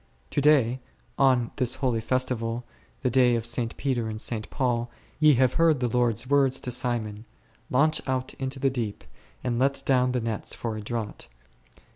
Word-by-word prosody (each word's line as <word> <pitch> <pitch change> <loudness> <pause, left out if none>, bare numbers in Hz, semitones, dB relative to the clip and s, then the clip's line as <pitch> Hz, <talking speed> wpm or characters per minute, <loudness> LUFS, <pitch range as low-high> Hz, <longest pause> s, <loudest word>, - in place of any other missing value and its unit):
To - - +1
day, 135 -4 +4 0.4
on 130 -4 +3
this 125 -2 +1
holy 125 -5 0
festival, 120 -1 -1 0.4
the 125 - +1
day 125 -1 +4
of 115 -1 -2
St. 115 -1 -2
Peter 125 -5 -1
and 110 0 -5
St. 110 -1 -3
Paul, 120 -3 -1 0.3
ye 155 -2 +6
have 130 0 +3
heard 165 -4 +3
the 125 - +1
Lord's 120 -1 +1
words 135 -1 +3
to 125 - -3
Simon, 115 -3 -2 0.4
Launch 155 +5 +3
out 130 0 -1
into 135 0 -3
the 135 0 +1
deep, 115 - -4 0.4
and 120 -1 -1
let 135 +1 +1
down 125 -1 +3
the 125 - +1
nets 115 -2 -4
for 115 -2 -4
a 110 - -5
draught 110 0 -5 0.5
d. - - -24
125 Hz, 180 wpm, -26 LUFS, 115-130 Hz, 0.5 s, ye